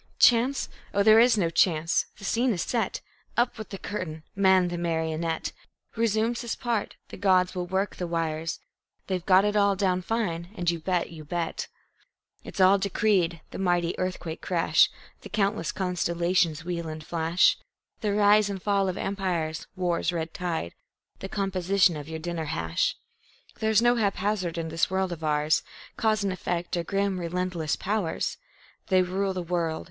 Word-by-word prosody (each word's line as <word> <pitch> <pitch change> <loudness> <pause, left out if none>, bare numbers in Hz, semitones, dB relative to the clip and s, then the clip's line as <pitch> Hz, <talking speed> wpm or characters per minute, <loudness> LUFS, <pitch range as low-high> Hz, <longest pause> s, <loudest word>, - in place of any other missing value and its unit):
Chance! 250 +3 +4 0.3
Oh, 200 - +4
there 220 +1 +7
is 235 -1 +5
no 170 -5 +1
chance! 165 -1 +2
The - - -14
scene 235 +5 +2
is 175 - -2
set. 235 -2 -1 0.4
Up 240 -1 +1
with 215 - -7
the 195 - -6
curtain! 170 -6 -5
Man, 190 -2 +4
the 175 - -3
marionette, 160 -1 -1 0.4
Resumes 230 +1 +1
his 235 -2 -3
part. 235 -4 -2
The - - -9
gods 185 -2 +3
will 180 -2 -3
work 190 +2 -1
the 180 - -3
wires. 165 -1 -2 0.5
They've 185 -3 -2
got 190 +1 +5
it 210 0 0
all 200 -1 +4
down 185 -2 +1
fine, 180 -5 -2
you 170 -2 0
bet, 175 +1 -1
you 160 -2 -9
bet! 165 +2 -3 0.8
It's - - -9
all 190 +1 +6
decreed 190 -4 +1
the - - -6
mighty 175 -2 +1
earthquake 180 -3 -3
crash, 175 -3 +3 0.3
The - - -10
countless 200 -5 0
constellations' 170 -3 0
wheel 170 -2 -3
and 155 0 -7
flash; 165 +1 +3 0.4
The 210 - -1
rise 205 0 +5
and 195 -1 -4
fall 195 0 +1
of 185 - -4
empires, 175 -5 -2
war's 175 -2 0
red 165 -1 -3
tide; 165 - -3 0.5
The 195 - -6
composition 190 -2 +2
of 150 0 -7
your 160 - -4
dinner 165 0 -4
hash. 80 - -1 0.6
There's 220 +1 +3
no 240 0 +4
haphazard 200 -4 0
in 165 -1 -3
this 165 +1 +1
world 190 0 0
of 165 -2 -6
ours. 150 0 +2 0.3
Cause 215 -2 +1
and 195 -2 0
effect 175 -1 -3
are 170 - -1
grim, 195 +1 -1
relentless 175 -2 -2
powers. 200 -4 -2 0.5
They 185 -1 +4
rule 190 +2 -1
the 180 - -2
world. 170 -2 -1
180 Hz, 165 wpm, -27 LUFS, 170-200 Hz, 0.8 s, there